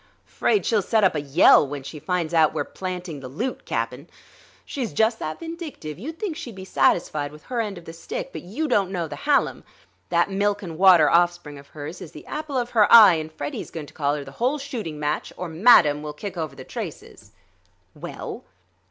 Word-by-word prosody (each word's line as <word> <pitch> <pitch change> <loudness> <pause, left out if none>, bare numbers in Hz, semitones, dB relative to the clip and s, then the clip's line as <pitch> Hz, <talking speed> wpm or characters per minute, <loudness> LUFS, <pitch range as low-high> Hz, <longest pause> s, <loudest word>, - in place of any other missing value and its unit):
"'Fraid 415 - 0
she'll 220 -4 +2
set 220 +3 +1
up 190 - +4
a 150 - -2
yell 140 0 +5
when 140 0 -6
she 150 +3 -8
finds 175 -1 -2
out 160 -2 +4
we're - - 0
planting 180 -4 -6
the 135 - -8
loot, 220 - -4
Cap'n. - - -3 0.6
She's 255 -6 -4
just 225 +1 +2
that 155 - -5
vindictive; 325 - -7
you'd 315 +9 -7
think 390 -7 -3
she'd 255 - -8
be 190 -1 -9
satisfied 150 -6 +1
with 150 0 -14
her 245 -2 -2
end 205 -4 -4
of 170 - -12
the 165 - -9
stick, - - -6
but - - -6
you 230 - -3
don't 195 -8 +2
know 175 -4 -3
the 145 - -7
Hallam. 285 - +1 0.5
That 170 +3 +2
milk 205 +1 0
and 165 -3 -6
water 175 -3 +6
offspring 175 -4 +1
of 140 - -15
hers 150 +5 -8
is 160 - -10
the 150 - -11
apple 300 -3 -4
of 245 -1 -2
her 215 -3 +4
eye, 215 -5 +10
and 160 -1 -3
Freddie's 145 -2 -6
going 160 -3 -7
to - - -16
collar 145 -1 -1
the 135 - -10
whole 260 +5 +2
shooting 230 - -6
match 150 0 -2
or 180 - -4
madam 160 -4 +5
will 150 0 -6
kick 200 +6 -7
over 155 -5 -4
the 130 - -9
traces." - - -8 0.6
"Well?" - - -7
175 Hz, 210 wpm, -24 LUFS, 150-230 Hz, 0.6 s, eye